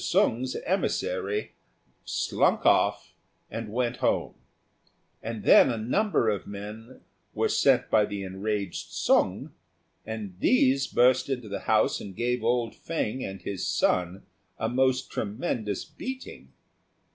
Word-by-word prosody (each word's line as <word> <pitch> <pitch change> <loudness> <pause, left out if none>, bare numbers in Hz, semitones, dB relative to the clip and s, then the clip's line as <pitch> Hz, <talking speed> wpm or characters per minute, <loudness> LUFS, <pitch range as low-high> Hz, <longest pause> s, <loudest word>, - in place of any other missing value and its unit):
Sung's 125 +3 +1
emissary 425 - -1 0.5
slunk - - +1
off - - +3 0.4
and 115 -2 -5
went 125 +1 -1
home; - - 0 0.9
and 115 -1 -5
then - - +7
a 120 - -1
number 125 - +1
of 105 -3 -1
men 105 +4 -9 0.3
were - - +2
sent - - +3
by 110 -1 +5
the 100 -1 -5
enraged 100 0 -3
Sung, - - +1 0.5
and 110 -4 -6
these 135 +3 +3
burst 125 +2 +3
into 125 -4 -3
the 100 - -4
house - - +3
and 95 -2 -8
gave 120 +1 -1
old 120 -1 +1
Fêng 130 -6 -3
and 95 0 -7
his 100 -2 -3
son 90 +2 0 0.3
a 110 - -1
most 130 +2 +1
tremendous 105 - -3
beating. 260 0 -8
115 Hz, 125 wpm, -27 LUFS, 105-130 Hz, 0.9 s, then